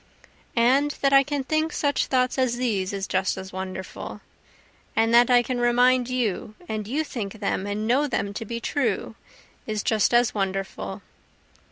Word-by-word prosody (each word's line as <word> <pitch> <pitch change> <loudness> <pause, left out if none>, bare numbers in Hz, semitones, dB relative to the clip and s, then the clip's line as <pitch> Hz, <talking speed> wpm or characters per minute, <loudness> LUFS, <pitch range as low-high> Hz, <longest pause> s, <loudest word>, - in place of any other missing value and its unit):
And 260 +5 +4
that 275 0 +4
I 275 - +8
can 285 0 -2
think 310 +3 0
such 285 -1 0
thoughts 255 0 +1
as 250 -2 +1
these 210 -7 -1
is 195 -1 -3
just 190 0 0
as 190 0 -8
wonderful, 190 0 -6 0.7
And 225 +1 +2
that 240 +1 +6
I 245 -1 +5
can 250 0 -2
remind 245 +1 +3
you, 225 -4 -2
and 215 -1 -4
you 290 +7 0
think 215 -9 -5
them 200 -2 -2
and 205 +1 -2
know 265 +6 +2
them 200 -6 -2
to 215 - -5
be 235 +2 -5
true, 235 -5 -1 0.5
is 215 -2 -2
just 220 -2 +2
as 240 0 +3
wonderful. 195 -1 -3
235 Hz, 170 wpm, -25 LUFS, 205-255 Hz, 0.7 s, I